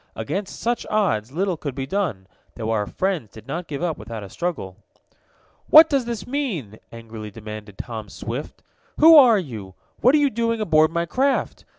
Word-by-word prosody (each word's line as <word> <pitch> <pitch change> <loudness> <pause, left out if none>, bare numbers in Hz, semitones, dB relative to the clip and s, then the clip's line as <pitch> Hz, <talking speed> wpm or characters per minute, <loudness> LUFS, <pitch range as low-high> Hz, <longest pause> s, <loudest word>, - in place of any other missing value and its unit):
Against 175 - -4
such 240 0 -1
odds 180 - 0
little 180 +3 -1
could 140 -4 -5
be 135 -1 -3
done, 145 - -2 0.3
though 110 -1 -3
our 105 -2 0
friends 185 - -2
did 110 - -13
not 165 +5 -5
give 145 +2 -5
up 165 -4 -2
without 110 0 -7
a 95 - -10
struggle. 160 - -4 0.9
"What 320 +1 +9
does 275 -4 +1
this 230 -5 -5
mean?" 195 - -4
angrily 115 -2 -9
demanded 105 -1 -9
Tom 110 -4 -6
Swift. 120 +8 -7 0.3
"Who 320 +1 +8
are 250 -7 +8
you? 110 - -6 0.2
What 255 +4 +5
are - - +6
you 285 -2 +2
doing 230 0 -1
aboard 155 -6 +3
my 170 +1 -1
craft? 265 +9 -1
155 Hz, 180 wpm, -22 LUFS, -, 0.9 s, What